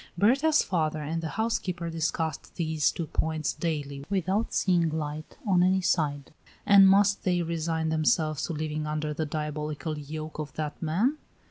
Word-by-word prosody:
Berta's 275 - +4
father 155 -4 -1
and 165 +3 -2
the 165 - -3
housekeeper 180 -4 -2
discussed 160 -1 -2
these 160 -3 +1
two 170 - -4
points 155 0 -1
daily 145 -4 -3
without 195 +3 0
seeing 175 -3 +2
light 155 0 -5
on 185 -4 +3
any 190 +1 +3
side. 145 -5 0 0.3
And 195 -1 +8
must 200 +1 +4
they 180 -2 +1
resign 160 -1 -1
themselves 155 -1 +1
to 170 - -3
living 155 0 -3
under 150 0 -2
the 155 +1 -2
diabolical 150 0 -3
yoke 155 +2 -7
of 150 -2 -5
that 150 -1 -4
man? 205 - +1
160 Hz, 155 wpm, -28 LUFS, 155-180 Hz, 0.3 s, And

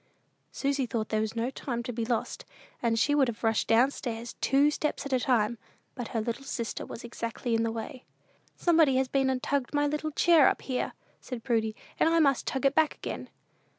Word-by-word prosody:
'Sh!" - - -15
Susy 275 -2 0
thought 220 -2 -2
there 215 0 +1
was 220 +1 -3
no 230 +3 -1
time 240 -3 -4
to 245 - -5
be 230 0 -2
lost, 235 -1 -2 0.4
and 230 -1 +1
she 290 +6 +3
would 285 -3 +4
have 235 -1 -5
rushed 225 -1 +1
down 240 +5 +4
stairs, 235 -3 -5
two 280 +2 +4
steps 300 -1 -2
at 280 - -3
a 255 - +3
time, 235 -3 +1 0.3
but 245 -3 -5
her 230 - -2
little 235 +4 -3
sister 235 -4 -4
was - - -8
exactly 235 0 -4
in 225 - +2
the 230 0 0
way. 230 +4 -6 0.5
"Somebody 320 -6 +4
has 260 0 +2
been 270 0 +1
and 255 -1 -1
tugged 280 0 -1
my 290 0 +3
little 300 +1 -1
chair 320 -1 +5
up - - 0
here," 255 -2 -2 0.3
said 245 -3 -7
Prudy, 220 -3 0 0.2
"and - - +4
I 330 - +3
must 280 -5 +3
tug 265 0 -1
it 275 - +4
back 315 0 +3
again." - - -6
255 Hz, 220 wpm, -29 LUFS, 230-280 Hz, 0.5 s, chair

